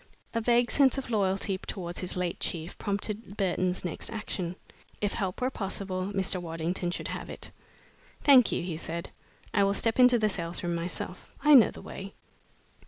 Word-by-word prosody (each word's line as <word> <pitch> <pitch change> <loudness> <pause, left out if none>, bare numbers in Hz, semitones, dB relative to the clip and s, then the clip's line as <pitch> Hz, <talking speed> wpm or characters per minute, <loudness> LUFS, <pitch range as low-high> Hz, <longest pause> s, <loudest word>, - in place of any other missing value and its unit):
A 230 - 0
vague 240 +1 +3
sense 275 -2 +4
of 265 -3 -4
loyalty 195 -2 0
towards 175 -3 -5
his 180 0 -1
late 180 -1 -2
chief 165 0 -3
prompted 205 +1 -3
Burton's 185 -2 0
next 175 - -2
action. 190 -5 -3 0.4
If 205 -1 0
help 190 -4 -2
were 255 +1 +1
possible, 190 -3 -2
Mr. 190 -2 +1
Waddington 170 +1 -2
should 175 - -4
have - - -5
it. - - -8 0.7
"Thank 260 -5 +7
you," - - -1
he 170 -3 -3
said, 170 +1 -5 0.4
"I 200 - +4
will 200 0 +2
step 225 +4 +1
into 250 -1 +7
the 215 -2 +2
sales 175 -4 -2
room 175 0 -1
myself. 170 +1 -5
I 300 0 +7
know 245 -7 +9
the - - -11
way." 195 +1 -8
195 Hz, 175 wpm, -29 LUFS, 175-220 Hz, 0.7 s, know